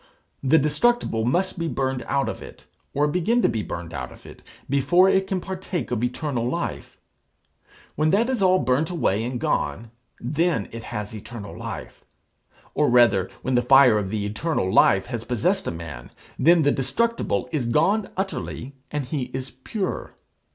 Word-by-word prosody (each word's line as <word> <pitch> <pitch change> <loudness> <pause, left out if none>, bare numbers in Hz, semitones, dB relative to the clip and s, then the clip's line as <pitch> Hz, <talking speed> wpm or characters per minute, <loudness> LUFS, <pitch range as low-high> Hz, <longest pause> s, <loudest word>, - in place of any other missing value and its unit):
The 140 +4 +4
destructible 150 - +1
must 175 +8 0
be 170 - -1
burned 130 -4 -1
out 140 0 +1
of - - -5
it, - - -12 0.3
or 145 +1 +1
begin 180 +10 +1
to - - +6
be 110 - -1
burned 85 -4 -6
out 65 -2 -5
of - - -15
it, - - -12 0.3
before 140 +7 +4
it 190 0 +2
can 190 -2 -1
partake 185 -3 -4
of 120 -1 -1
eternal 125 -1 -1
life. - - -4 1.0
When 155 +1 +2
that 215 +7 +3
is 255 -5 -1
all 185 -1 +5
burnt 140 0 +1
away 115 - 0
and 125 +1 -3
gone, 90 +9 -1 0.3
then 150 - 0
it 115 -1 -8
has 105 -2 -5
eternal 105 0 -8
life. - - -7 0.7
Or - - +2
rather, 115 -6 +4
when 130 - -1
the 125 - +4
fire 125 -3 +6
of 95 -2 -4
eternal 105 - -1
life 95 0 +5
has 120 -2 -5
possessed 130 - 0
a - - 0
man, 80 -7 -8 0.3
then 170 0 +5
the 145 - +4
destructible 230 - 0
is 140 -7 -1
gone 190 - +2
utterly, 145 -7 -4 0.2
and 150 -2 -3
he 130 0 -2
is 130 0 -5
pure. 185 - -4
135 Hz, 170 wpm, -24 LUFS, 115-175 Hz, 1.0 s, to